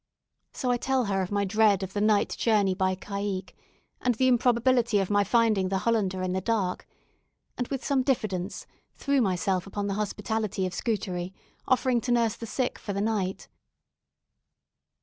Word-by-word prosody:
So 250 -3 -1
I 245 - +2
tell 260 0 0
her 195 -1 0
of 185 - -3
my 200 0 +1
dread 205 -1 +3
of 190 0 -6
the 205 - -1
night 210 -1 +3
journey 205 -4 +2
by 185 0 0
caicque, 200 0 -4 0.5
and 245 -1 +1
the 260 +3 +2
improbability 245 -2 +3
of 195 0 0
my 205 0 +4
finding 215 -3 +2
the 195 - 0
"Hollander" 195 -3 0
in 185 0 -1
the 190 - -1
dark; 195 -3 -1 0.7
and, 245 - -3
with 270 -2 -4
some 275 -2 +2
diffidence, 210 -8 -2 0.3
threw 280 -1 +1
myself 190 -2 0
upon 200 +1 -3
the 200 - -1
hospitality 210 -1 -2
of 180 - -4
Scutari, 185 -4 -3 0.3
offering 255 -2 +2
to 245 - -2
nurse 230 -3 +2
the 230 - -8
sick 250 +3 -2
for 200 - -5
the 200 - -2
night. 205 -3 -1
205 Hz, 170 wpm, -27 LUFS, 190-235 Hz, 0.7 s, my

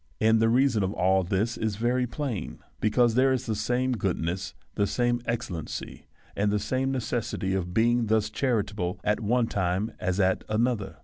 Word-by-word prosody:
And 110 0 +4
the 115 - +4
reason 125 -2 +3
of 95 +1 -1
all 95 +1 +3
this 100 +6 -1
is 110 -2 -1
very 125 +3 +1
plain, 125 -4 -4 0.2
because 115 +2 +3
there 130 +3 +4
is 130 -2 0
the 110 - -1
same 125 +4 0
goodness, 95 -4 -2 0.2
the 100 - +1
same 120 +1 0
excellency, 95 -9 -4 0.3
and 105 +1 +1
the 105 - +2
same 130 +5 -1
necessity 120 -6 -2
of 90 -2 -2
being 115 +3 +2
thus 110 0 +1
charitable 105 -8 -1
at 105 - +1
one 120 +2 +2
time 95 +1 -1
as 90 +1 -1
at 95 -1 +2
another. 110 -2 0
110 Hz, 175 wpm, -27 LUFS, 95-120 Hz, 0.3 s, And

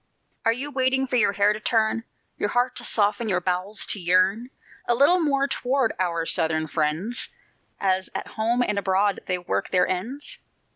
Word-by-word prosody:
Are 225 - +5
you 270 +5 -3
waiting 265 0 +1
for 255 - -3
your 210 -4 +3
hair 205 +1 +3
to 215 - -6
turn, 225 +1 0 0.3
Your 205 - 0
heart 245 +2 0
to - - -4
soften, 215 +2 +1
your 180 -2 +2
bowels 185 +4 -1
to 205 - -2
yearn 185 +7 +2 0.4
A 240 - +3
little 285 +8 +5
more 280 -3 +1
toward 260 -2 0
"our 170 -3 -1
Southern 160 -1 +1
friends," 160 +9 -2 0.5
As 190 -1 0
at - - -4
home 235 +3 0
and 210 -3 0
abroad 195 +1 +1
they 185 - +1
work 175 - -3
their 180 - +2
ends? 255 - -5
210 Hz, 180 wpm, -24 LUFS, 185-250 Hz, 0.5 s, Are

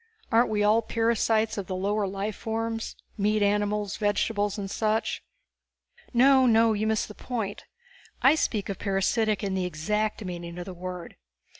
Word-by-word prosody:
Aren't 230 +1 +4
we 210 -1 +1
all 215 +2 +4
parasites 225 -1 +1
of 190 - -5
the 185 - -3
lower 200 +2 0
life 195 +2 -3
forms? 225 0 -3 0.2
Meat 210 +1 +2
animals, 205 0 0
vegetables 205 0 0
and 200 -1 -4
such?" 215 +2 -1 0.9
"No, 260 +1 +5
no 225 -1 +5
you 215 +1 -1
miss 220 -1 +1
the 210 - -10
point! 220 -4 -4 0.6
I 270 - +7
speak 215 -10 -1
of 195 - -5
parasitic 210 +2 +1
in 195 -1 -1
the 185 -1 0
exact 210 +6 -2
meaning 175 -1 -6
of 175 - -5
the 190 - -7
word. 180 0 -7
210 Hz, 160 wpm, -27 LUFS, 195-225 Hz, 0.9 s, I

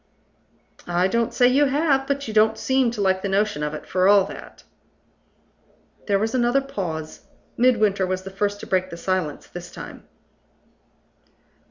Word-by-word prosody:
"I 175 +1 +2
don't 235 +3 0
say 245 - +4
you 275 +4 +4
have. 275 -1 +1
But 280 -1 -2
you 220 - -5
don't 220 +1 +3
seem 260 -2 +1
to 230 -3 -4
like 190 -1 +1
the 200 - -3
notion 200 -4 0
of 150 0 -2
it, - - -9
for 185 0 +2
all 200 -1 +6
that." - - -11 1.4
There 200 -2 +3
was 220 +4 -1
another 245 +1 +2
pause. 175 - -5 0.3
Midwinter 215 -6 +2
was 185 0 -3
the 195 - -8
first 205 +1 -2
to - - -7
break 185 0 0
the 170 - -8
silence 180 -4 -2
this 175 0 -9
time. - - -11
205 Hz, 165 wpm, -23 LUFS, 185-245 Hz, 1.4 s, all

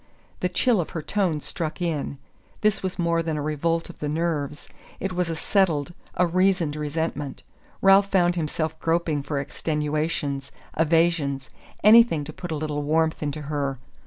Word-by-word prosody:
The 180 - 0
chill 220 +2 +2
of 160 - -5
her 155 - -4
tone 180 -7 0
struck 160 +1 -3
in. 160 -5 -2 0.4
This 215 -1 +2
was 185 -1 -3
more 170 -1 +1
than 160 -2 -2
a - - -2
revolt 165 +3 0
of 175 - -12
the 150 - -2
nerves: 150 -2 -2 0.3
it 195 -1 -2
was 180 -1 0
a 165 - -2
settled, 170 -3 +1 0.2
a 180 - +3
reasoned 180 -3 +2
resentment. 150 -1 -3 0.4
Ralph 195 +1 +7
found 175 -2 +3
himself 160 -1 -2
groping 165 -3 +1
for 145 +1 -3
extenuations, 150 -1 -2 0.3
evasions 160 -4 +1 0.3
anything 215 -7 +7
to 155 +2 -8
put 175 - -7
a - - 0
little 150 -1 -2
warmth 160 +2 +1
into 150 0 -3
her! 140 -2 -2
160 Hz, 160 wpm, -25 LUFS, 150-175 Hz, 0.4 s, Ralph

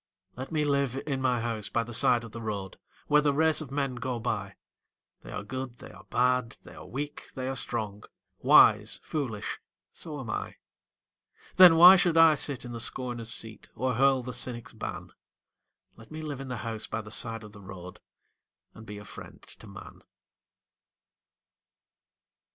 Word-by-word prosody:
Let 130 +4 -7
me 155 -2 +1
live 140 -2 0
in 135 -3 -2
my 125 -2 +1
house 115 -3 -3
by 115 - 0
the 120 +1 -9
side 120 +1 +3
of 115 - -10
the 115 - -8
road, 100 -4 -5 0.3
Where 150 0 +4
the 145 -1 +1
race 160 +1 +3
of 150 - -7
men 135 -1 -1
go 125 0 -3
by 105 -4 -3 0.7
They - - -11
are - - -5
good, 130 +2 -6
they - - -12
are - - -15
bad, 125 -1 +1
they - - -13
are - - -11
weak, 145 +3 -6
they 130 -1 -4
are 135 - -2
strong, 105 -5 -4 0.3
Wise, - - +5
foolish 120 -9 -4 0.3
so 150 -2 -7
am 130 - -7
I. - - -4 1.0
Then 180 -3 +10
why 180 +3 +10
should 175 -2 +2
I 165 -1 +8
sit 140 -3 -1
in 120 - -7
the 115 - -6
scorner's 120 -1 -3
seat, 110 -1 -6
Or 130 +2 -1
hurl 135 +1 +3
the 125 +1 -6
cynic's 120 -2 -4
ban? - - -7 0.8
Let 115 0 -16
me 155 0 -7
live 145 -3 -5
in 135 - -7
my 125 -1 -4
house 110 -1 -5
by 110 - -3
the 110 0 -12
side 115 0 -2
of 105 - -11
the 100 -1 -14
road 90 -2 -10 0.7
And 110 0 -13
be 105 0 -7
a 105 - -10
friend - - -11
to - - -12
man. - - -12
125 Hz, 180 wpm, -28 LUFS, 110-140 Hz, 1.0 s, Then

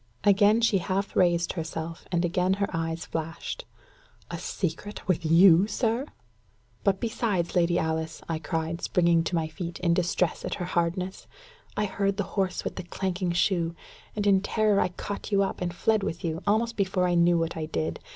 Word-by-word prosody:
Again 205 +2 +5
she 225 -4 +3
half 195 +2 -2
raised 175 -1 +3
herself, 165 -1 -5
and 175 -1 +1
again 180 +2 +1
her 200 0 0
eyes 165 0 -2
flashed. 165 - -5 0.7
"A - - -4
secret 200 +4 -4
with 180 -2 +1
you, 170 +3 +6
sir!" 230 +5 0 0.8
"But, 195 -1 +2
besides, 210 -7 -1
Lady 175 -1 +3
Alice," 160 -1 -2
I 165 -1 -2
cried, 160 +1 -3
springing 170 -2 +3
to 175 - -1
my 160 -1 0
feet, 170 +1 -6
in 170 -2 +3
distress 175 0 0
at - - -2
her 175 - -4
hardness, 180 +2 -2 0.5
"I 210 - +2
heard 195 0 -1
the 205 - +1
horse 190 -2 0
with - - -5
the - - -4
clanking 180 0 -2
shoe, 170 -2 +1 0.4
and, 210 -1 -1
in 195 -2 +5
terror, 210 0 +2
I - - +3
caught 200 +4 -6
you 200 -1 +4
up, 195 - -3
and 175 -1 -1
fled 215 +5 +1
with 175 - -3
you, 165 +1 -2
almost 230 +3 +2
before 185 -2 +1
I 175 - +1
knew 170 0 +4
what 165 0 -1
I 155 -1 -3
did. 155 0 -2
180 Hz, 185 wpm, -27 LUFS, 170-200 Hz, 0.8 s, you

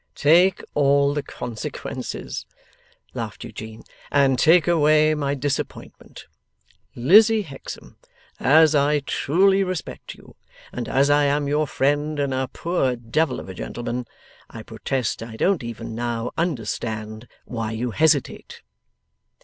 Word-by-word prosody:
'Take 175 +5 +4
all 140 0 +3
the 145 - -1
consequences,' 120 -5 -6 0.7
laughed - - -6
Eugene, 110 0 -9 0.3
'and 135 -2 +3
take 165 +1 +5
away 155 -2 +4
my 140 -2 -1
disappointment. 140 0 -5 0.7
Lizzie 210 - +5
Hexam, 140 -7 -10 0.4
as 155 +2 +5
I 145 0 +2
truly 190 +8 +2
respect 185 -2 -6
you, - - -18 0.4
and 125 - -5
as 140 +2 +3
I 145 0 +4
am 145 0 +1
your 150 +1 +1
friend 145 +3 0
and 140 -2 0
a 130 0 -1
poor 165 -7 -1
devil 120 +7 -1
of - - -9
a 95 - -7
gentleman, 120 +5 -5 0.4
I - - -9
protest 130 -6 -3
I 115 0 -8
don't 185 - +1
even 115 -1 -7
now 120 0 -3
understand 110 -7 -3 0.2
why 115 -2 -4
you 120 +2 -3
hesitate. 150 0 0
140 Hz, 125 wpm, -23 LUFS, 120-155 Hz, 0.7 s, take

